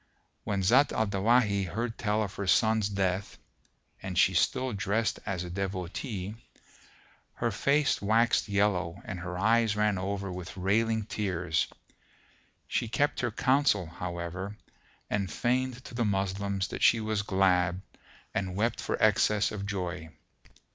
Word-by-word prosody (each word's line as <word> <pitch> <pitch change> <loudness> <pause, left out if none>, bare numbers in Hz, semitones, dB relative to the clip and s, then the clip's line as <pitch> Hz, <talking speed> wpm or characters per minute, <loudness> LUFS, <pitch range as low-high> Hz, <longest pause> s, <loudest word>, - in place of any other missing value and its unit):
When 100 -2 -1
Zat 130 +9 +5
al 110 - +1
Dawahi 100 0 +2
heard 115 +5 -3
tell 105 -1 0
of 100 - -5
her 100 - -4
son's 110 +1 +3
death 95 0 -1 0.6
(and 95 -2 -5
she 95 - +5
still 125 +9 +1
drest 105 +3 0
as 90 -2 -2
a 90 - -6
devotee), 95 +2 -4 1.0
her 120 -1 -1
face 145 +7 +2
waxed 110 +1 +2
yellow 100 -3 +1
and 90 - -5
her 90 0 -5
eyes 110 +2 +3
ran 105 -2 +1
over 100 0 -3
with 90 +1 -7
railing 110 +3 +1
tears: 90 -6 -1 1.0
she 120 - -1
kept 145 +6 0
her 120 - 0
counsel, 130 -4 +2
however, 85 +4 -5 0.5
and 100 -4 -1
feigned 125 +5 -1
to - - -10
the 120 0 0
Moslems 100 -1 -1
that - - -6
she 115 - +5
was 110 -1 -1
glad 90 -3 +2 0.5
and 95 -2 -2
wept 115 +4 0
for - - -2
excess 105 -1 +3
of 100 -1 -5
joy. 90 -4 -4
100 Hz, 140 wpm, -29 LUFS, 95-110 Hz, 1.0 s, Zat